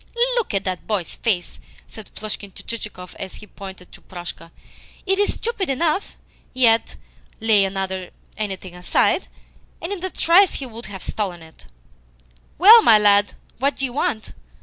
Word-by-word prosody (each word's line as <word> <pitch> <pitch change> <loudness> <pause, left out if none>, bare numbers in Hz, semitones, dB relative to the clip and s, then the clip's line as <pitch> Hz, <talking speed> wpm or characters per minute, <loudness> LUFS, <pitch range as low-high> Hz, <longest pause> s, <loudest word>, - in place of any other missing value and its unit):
"Look 460 - -1
at 195 - +1
that 185 -1 -4
boy's 200 -6 -2
face!" 185 -7 -2 0.3
said 220 -2 -12
Plushkin 205 -2 -6
to - - -13
Chichikov 210 -5 -7
as 190 - -6
he - - -11
pointed 190 -3 -11
to - - -14
Proshka. 175 -2 -9 0.6
"It 385 0 +1
is 410 - +2
stupid 445 -6 -3
enough, 315 +7 0 0.4
yet, 230 -3 +3 0.4
lay 215 -3 +4 0.7
anything 190 -4 -5
aside, 180 0 +1 0.5
and 340 - -5
in 370 -3 -7
a 375 - -1
trice 365 +2 +4
he 275 - -5
will 230 -2 -9
have 195 -2 -8
stolen 185 -6 -4
it. 160 - -17 0.9
Well, 435 +7 +10
my 225 - +7
lad, 205 -1 +4 0.2
what 280 +3 +1
do 270 - -1
you 250 - -4
want?" 220 -5 -2
215 Hz, 155 wpm, -22 LUFS, 190-285 Hz, 0.9 s, Well